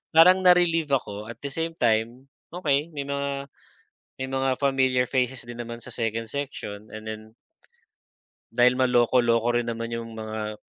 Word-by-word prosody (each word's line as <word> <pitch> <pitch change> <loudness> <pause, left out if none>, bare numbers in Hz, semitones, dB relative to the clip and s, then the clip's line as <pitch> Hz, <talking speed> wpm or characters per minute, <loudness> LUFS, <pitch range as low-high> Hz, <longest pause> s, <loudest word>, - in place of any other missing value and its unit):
parang 180 +3 +8
na-relieve 170 -4 +4
ako 105 -4 -2
at 115 - -8
the 140 - -5
same 165 0 -2
time 115 +3 +1 0.2
okey 155 -3 0
may 140 - -3
mga 140 0 -3 0.7
may 130 0 -4
mga 135 -1 0
familiar 130 -2 +2
faces 125 -1 -1
din 120 0 -7
naman 115 0 -6
sa 125 - -8
second 115 0 -2
section 110 -5 -6
and 110 0 -9
then 110 0 -7 1.2
dahil 125 +1 +4
maloko-loko 120 -1 +3
rin 120 - -4
naman 115 0 -4
yung 115 -1 -5
mga 110 -1 -5
125 Hz, 150 wpm, -25 LUFS, 115-140 Hz, 1.2 s, parang